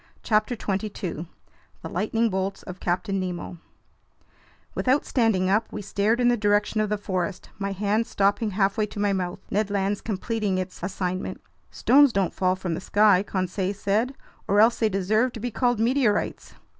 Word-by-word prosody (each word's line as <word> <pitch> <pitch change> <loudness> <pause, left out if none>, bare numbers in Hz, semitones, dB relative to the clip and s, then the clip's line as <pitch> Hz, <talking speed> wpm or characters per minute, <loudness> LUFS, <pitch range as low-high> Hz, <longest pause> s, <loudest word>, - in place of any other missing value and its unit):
CHAPTER 215 +2 +1
22 195 -6 -4 0.6
The - - -4
Lightning 220 +5 0
Bolts 190 +1 -2
of 185 0 -9
Captain 195 +3 -1
Nemo 180 -2 -5 1.1
WITHOUT 265 +3 +1
STANDING 220 -7 +2
UP, 210 +4 +1
we 210 - -5
stared 210 +4 +1
in 245 - +3
the 245 - +4
direction 210 0 +1
of 215 - 0
the 210 - 0
forest, 185 -2 -3
my 200 0 -2
hand 205 +3 0
stopping 205 +2 +1
halfway 205 +2 +1
to 210 - -8
my 205 -1 +2
mouth, 180 -2 -3
Ned 205 +1 +1
Land's 200 0 -1
completing 210 -1 -2
its 185 0 -5
assignment. 185 0 -3 0.3
"Stones 285 0 +5
don't 195 -4 0
fall 185 -1 +1
from 185 -2 -3
the 165 - -4
sky," 205 -1 +4
Conseil 190 0 -2
said, 215 +7 0 0.3
"or 205 - +3
else 225 +2 +5
they 220 - +3
deserve 215 +6 +1
to 230 - -7
be 245 +2 -3
called 245 0 +1
meteorites." 235 -2 0
205 Hz, 170 wpm, -25 LUFS, 190-220 Hz, 1.1 s, Stones